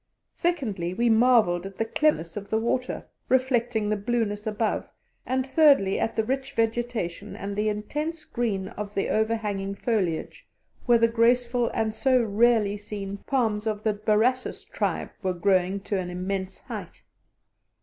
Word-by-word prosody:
Secondly, 215 - -1
we 235 +2 +3
marvelled 220 -7 +4
at 195 - -12
the 225 - 0
clearness 225 - +1
of 200 -1 -6
the 220 - +1
water, 245 +3 -1 0.2
reflecting 245 -4 +2
the 215 - +1
blueness 210 -1 -1
above; 215 0 -1 0.4
and, 260 0 0
thirdly, 275 -8 +4
at 225 - -1
the 220 - +1
rich 270 +3 -2
vegetation 225 -5 -2
and 200 0 -5
the 210 +1 +1
intense 300 +10 -3
green 200 -6 -2
of 210 0 -7
the 195 - 0
overhanging 210 -3 -1
foliage, 200 - -2 0.4
where 240 -1 +6
the 230 0 +4
graceful 240 +1 +2
and 220 -1 -1
so 255 +2 +3
rarely 220 -2 +3
seen 200 -1 -6
palms 225 -5 0
of 215 -1 -2
the 215 -1 +2
Borassus 220 +5 +1
tribe - - -2
were 185 -2 0
growing 185 +1 +2
to 200 0 -2
an 180 -1 -4
immense 190 +1 -4
height. - - -8
220 Hz, 150 wpm, -26 LUFS, 200-240 Hz, 0.4 s, where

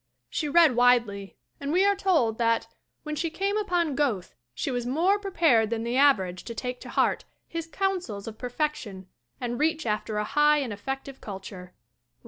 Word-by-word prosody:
She 300 - -1
read 315 -4 +5
widely 235 -5 +2 0.2
and 280 0 -3
we 370 +4 +4
are 405 0 +4
told 320 - +1
that 230 -1 +2 0.4
"when 305 -1 -4
she 330 +3 -1
came 390 +5 -1
upon 355 -7 0
Goethe 255 -10 -1 0.2
she 275 - -2
was 245 -1 -1
more 335 +11 +2
prepared 325 - +3
than 225 -1 -2
the 235 +1 -2
average 195 -11 +3
to 230 - -6
take 250 +1 -4
to - - -9
heart - - +1 0.2
his 330 -1 -5
counsels 360 - -2
of 220 -1 -8
perfection 245 - -3 0.3
and 240 -1 -3
reach 315 0 +1
after 215 0 -2
a 210 - +1
high 295 +6 +3
and 265 -7 -2
effective 270 +5 -6
culture!" 190 -2 -9
260 Hz, 175 wpm, -27 LUFS, 225-320 Hz, 0.4 s, read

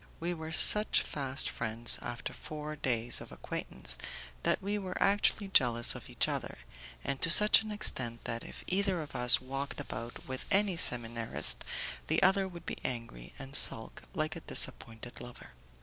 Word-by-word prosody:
We 175 +2 -3
were 160 -1 -8
such 210 +6 +8
fast 135 -1 -2
friends, 115 +1 -1
after 120 -1 -6
four 150 0 -7
days 120 -4 0
of - - -11
acquaintance, - - -7 0.4
that - - 0
we 205 +2 -3
were 185 -2 -6
actually 200 0 +1
jealous 120 -8 +3
of - - -11
each - - +1
other, - - -5 0.5
and 140 -1 -4
to - - +2
such 210 +6 +7
an 220 - -8
extent 130 - -2
that 115 0 -5
if - - -10
either 190 -1 0
of 145 - -13
us 125 0 +5
walked 135 +2 -6
about 115 +2 -8
with 130 -1 -6
any 200 -1 +2
seminarist, 115 -6 +2 0.4
the - - +1
other 190 +1 +3
would 170 -2 -11
be - - -6
angry 115 - -6
and 135 0 -3
sulk 110 -5 +1
like 155 +1 -2
a - - -6
disappointed 120 -4 -4
lover. 125 0 -12
135 Hz, 165 wpm, -31 LUFS, 120-185 Hz, 0.5 s, such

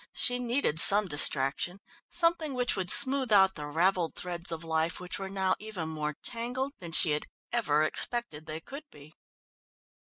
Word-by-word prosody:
She 245 0 -1
needed 240 - -1
some 205 +4 +9
distraction, 145 +3 +1 0.3
something 335 -4 -1
which 245 -1 -2
would 185 -3 -4
smooth 265 0 +5
out 190 -2 +4
the 150 -4 -8
ravelled 170 +2 -1
threads 175 -1 -3
of 165 0 -6
life 160 0 -3
which 180 +2 -7
were 195 -1 -7
now 190 -1 -2
even 205 -7 -7
more 150 -1 -5
tangled 250 +4 -5
than 170 -2 -9
she 160 0 +3
had 150 0 -3 0.3
ever 155 -11 0
expected 160 -2 -3
they 155 +1 -7
could 280 - -11
be. 150 +1 -17
180 Hz, 165 wpm, -27 LUFS, 160-240 Hz, 0.3 s, some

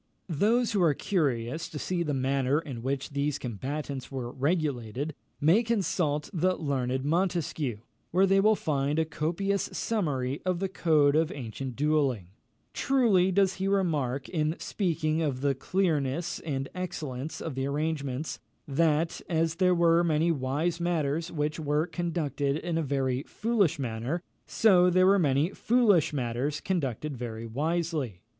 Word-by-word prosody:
Those 220 +9 +2
who 205 -4 +1
are 160 -5 +4
curious 145 - -1
to 150 - -7
see 175 +4 -2
the 155 -3 -1
manner 135 +1 +1
in 135 -8 -7
which 135 +3 -2
these 140 0 -1
combats 135 +4 -5
were 125 -3 -4
regulated, 140 -2 -1 0.3
may 165 +10 +5
consult 180 -10 0
the 185 +1 +2
learned 130 -4 -1
Montesquieu, 160 - -1 0.3
where 185 +3 +4
they 195 0 +4
will 215 +2 +5
find 145 -4 -1
a 160 - +2
copious 175 +6 -1
summary 145 - -1
of 185 -1 0
the 195 +2 -2
code 150 -6 +3
of 160 0 +2
ancient 125 0 -6
duelling. 140 - +1 0.4
Truly 220 -9 +3
does 190 0 +2
he 190 0 -1
remark, 150 -9 0
in 155 -1 0
speaking 160 -4 -1
of 140 -5 -1
the 140 0 +2
clearness 165 0 -1
and 135 -4 -3
excellence 160 -6 -5
of 160 - -4
the 135 +1 -2
arrangements, 145 -1 -2 0.3
that, 160 +2 +1
as 165 -1 +1
there 180 0 +4
were 170 0 +4
many 165 0 +2
wise 150 +4 -1
matters 165 -2 -1
which 150 0 -2
were 150 +1 +1
conducted 160 -5 -1
in 170 +1 -3
a 165 - +1
very 135 -3 0
foolish 210 -8 +1
manner, 130 +6 -3 0.2
so 180 -5 +5
there 185 +1 +4
were 195 +1 +5
many 145 +2 +2
foolish 210 -10 +3
matters 135 +2 -2
conducted 150 - -2
very 115 -2 -5
wisely. 150 - -2
155 Hz, 150 wpm, -28 LUFS, 135-175 Hz, 0.4 s, may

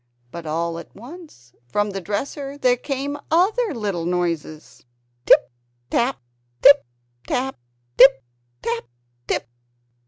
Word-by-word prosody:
But 170 -2 -8
all 165 +2 -2
at - - -13
once, 245 - -13
from 205 +10 0
the 195 0 -5
dresser, 275 - -4
there 250 -3 +3
came 275 +2 -4
other 405 +7 +2
little 200 -7 -2
noises 170 -3 -3 0.4
Tip - - +6 0.4
tap, 255 +3 +1 0.4
tip 285 - +7 0.4
tap, 260 - -2 0.4
tip 265 - +8 0.4
tap 235 0 -2 0.4
tip! - - -1
230 Hz, 115 wpm, -22 LUFS, 170-280 Hz, 0.4 s, tip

